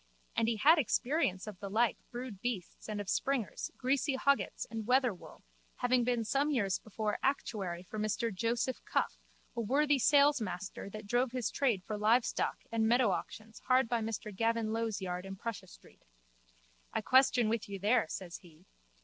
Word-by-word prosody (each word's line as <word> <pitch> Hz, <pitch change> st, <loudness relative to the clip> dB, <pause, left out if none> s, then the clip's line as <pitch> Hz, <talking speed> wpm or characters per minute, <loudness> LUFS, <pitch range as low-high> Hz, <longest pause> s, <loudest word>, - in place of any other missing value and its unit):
And 225 Hz, -, +2 dB
he 230 Hz, -, +1 dB
had 310 Hz, +8 st, +6 dB
experience 245 Hz, -, 0 dB
of 210 Hz, -4 st, -8 dB
the 200 Hz, -, -6 dB
like 230 Hz, +3 st, +2 dB
brood 240 Hz, -5 st, -7 dB
beasts 225 Hz, -4 st, -4 dB
and 210 Hz, -1 st, -3 dB
of 205 Hz, -, -5 dB
springers, 255 Hz, +1 st, -1 dB
greasy 270 Hz, +2 st, +1 dB
hoggets 280 Hz, +1 st, +1 dB
and 225 Hz, -2 st, -5 dB
wether 250 Hz, -2 st, +3 dB
wool, 180 Hz, -, -14 dB, 0.3 s
having 245 Hz, 0 st, +2 dB
been 240 Hz, -1 st, +1 dB
some 275 Hz, +6 st, +1 dB
years 205 Hz, -9 st, +1 dB
before 215 Hz, 0 st, -3 dB
actuary 195 Hz, -10 st, -1 dB
for 210 Hz, +4 st, -7 dB
Mr 215 Hz, +1 st, -1 dB
Joseph 235 Hz, +6 st, -1 dB
Cuffe, -, -, -1 dB, 0.4 s
a 235 Hz, -, -1 dB
worthy 285 Hz, +5 st, +2 dB
salesmaster 245 Hz, -11 st, +2 dB
that 215 Hz, +1 st, -8 dB
drove 245 Hz, +3 st, +1 dB
his 250 Hz, -3 st, -1 dB
trade 235 Hz, -10 st, +1 dB
for 215 Hz, +1 st, -4 dB
live 225 Hz, +3 st, +4 dB
stock -, -, -2 dB
and 225 Hz, -1 st, +2 dB
meadow 240 Hz, -2 st, +4 dB
auctions 220 Hz, +4 st, -5 dB
hard 255 Hz, -1 st, +4 dB
by 235 Hz, 0 st, 0 dB
Mr 215 Hz, -2 st, -4 dB
Gavin 225 Hz, +1 st, 0 dB
Low's 225 Hz, -3 st, -2 dB
yard 180 Hz, -1 st, -3 dB
in 195 Hz, 0 st, -7 dB
Prussia 230 Hz, +1 st, -6 dB
street. -, -, -18 dB, 0.9 s
I -, -, -1 dB
question 255 Hz, -1 st, +4 dB
with 220 Hz, -1 st, -1 dB
you 200 Hz, -, -4 dB
there, 205 Hz, 0 st, +2 dB
says 175 Hz, -3 st, -6 dB
he. 170 Hz, -1 st, -19 dB
225 Hz, 175 wpm, -33 LUFS, 205-250 Hz, 0.9 s, had